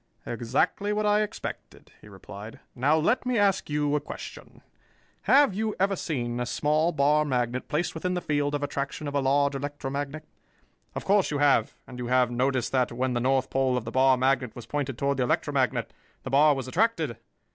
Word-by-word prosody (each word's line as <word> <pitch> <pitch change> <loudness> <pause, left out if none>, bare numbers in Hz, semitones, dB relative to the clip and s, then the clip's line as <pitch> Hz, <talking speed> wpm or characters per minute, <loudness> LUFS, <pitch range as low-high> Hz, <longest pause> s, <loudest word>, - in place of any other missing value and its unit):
"Exactly 125 - -1
what 210 0 0
I 210 0 +3
expected," 210 - -7
he - - -15
replied. 100 +2 -10
"Now 145 +5 +2
let 165 +11 +1
me 250 -2 0
ask 200 -4 +2
you 150 0 0
a 150 - 0
question. - - -10 0.7
Have 280 -5 +6
you 215 +2 -2
ever 195 +1 +2
seen 120 -9 -3
a 125 - -2
small 155 +5 +1
bar 150 0 +3
magnet 125 -3 -1
placed 160 +3 -1
within 180 +3 -2
the - - 0
field 145 -2 0
of 145 - -3
attraction 140 +1 -3
of 145 - -4
a 140 - +1
large 140 +1 +2
electromagnet? 145 +1 -4 0.7
Of - - -5
course 200 0 +3
you 145 - -1
have, 140 -6 +3
and 125 -1 -10
you 120 - -4
have 125 -1 +2
noticed 130 0 0
that, 130 -2 +1
when 125 +2 -1
the 120 - 0
north 130 +1 +1
pole 130 -1 +1
of 120 - -4
the - - -5
bar 130 0 +4
magnet 130 -2 +1
was 120 - -9
pointed 135 -1 -3
toward 140 +1 0
the 130 - +1
electromagnet, - - 0 0.3
the 130 - -6
bar 145 +2 +5
was 130 -2 -5
attracted. 160 - 0
140 Hz, 195 wpm, -27 LUFS, 125-155 Hz, 0.7 s, Have